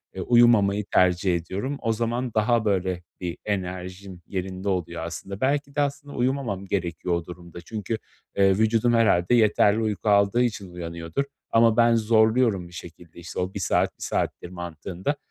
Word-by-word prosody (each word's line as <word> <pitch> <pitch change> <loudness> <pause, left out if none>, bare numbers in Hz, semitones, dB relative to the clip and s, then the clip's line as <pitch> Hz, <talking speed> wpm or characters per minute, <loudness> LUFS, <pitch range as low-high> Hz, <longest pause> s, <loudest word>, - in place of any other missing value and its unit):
eee, - - -4
uyumamayı 110 -4 +4
tercih 90 0 +3
ediyorum. 95 - -3
O 115 -1 +1
zaman 120 +2 -2
daha 110 +1 +2
böyle 95 -3 0 0.2
bir 85 -2 -4
enerjim 95 -1 -5
yerinde 95 0 -4
oluyor 85 -3 -2
aslında. 95 +4 -7
Belki 140 +1 0
de 145 - +2
aslında 145 0 -3
uyumamam 125 -6 -1
gerekiyor 90 -2 -2
o 85 -1 -4
durumda 85 0 -10
çünkü, 110 +3 -4 0.4
eee, 95 -1 +4
vücudum 115 +2 +2
herhâlde 105 -4 +3
yeterli 105 -1 +4
uyku 110 -1 -1
aldığı 100 +4 +4
için 105 -5 -3
uyanıyordur. 85 +5 -4 0.3
Ama 115 0 +4
ben 115 0 +5
zorluyorum 110 -3 +3
bir 85 - -16
şekilde 85 -1 -11
işte 85 -1 -7
o, 90 +1 -2
"1 - - -4
saat, 90 - 0
1 - - -8
saattir." 90 - -2
mantığında. 90 - -4
100 Hz, 160 wpm, -25 LUFS, 90-115 Hz, 0.4 s, ben